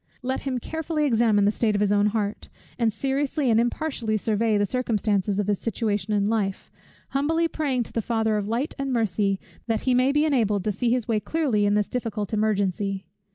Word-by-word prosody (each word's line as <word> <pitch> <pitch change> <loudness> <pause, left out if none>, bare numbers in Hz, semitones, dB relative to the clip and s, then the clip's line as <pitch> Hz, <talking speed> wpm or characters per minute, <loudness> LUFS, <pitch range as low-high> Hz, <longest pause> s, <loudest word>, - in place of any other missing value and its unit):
Let 260 +1 -1
him 265 -2 -2
carefully 315 +3 -2
examine 225 -5 +3
the 205 - +4
state 215 -1 0
of - - +1
his 205 -1 +2
own 205 0 +3
heart, 210 -1 -2 0.3
and 230 -2 +2
seriously 270 +3 0
and 225 - +4
impartially 240 -2 -1
survey 215 +1 +1
the 205 - +2
circumstances 210 -4 0
of 205 - +1
his 205 -2 0
situation 210 -1 -1
in 205 -1 +2
life; 205 -3 -1 0.4
humbly 320 +5 +1
praying 275 -6 -1
to - - -13
the 230 - 0
Father 220 -1 0
of 205 -1 -1
light 240 +7 -1
and 275 -1 -2
mercy, 205 -4 +1 0.3
that 225 -2 0
he 255 - +1
may 255 +2 +3
be 295 +2 +2
enabled 220 -10 +1
to 215 - 0
see 230 +4 -1
his 245 -1 0
way 225 -3 +1
clearly 240 -7 0
in 205 - +2
this 210 -1 +1
difficult 220 -4 -3
emergency. 200 -2 0
220 Hz, 200 wpm, -25 LUFS, 205-255 Hz, 0.4 s, the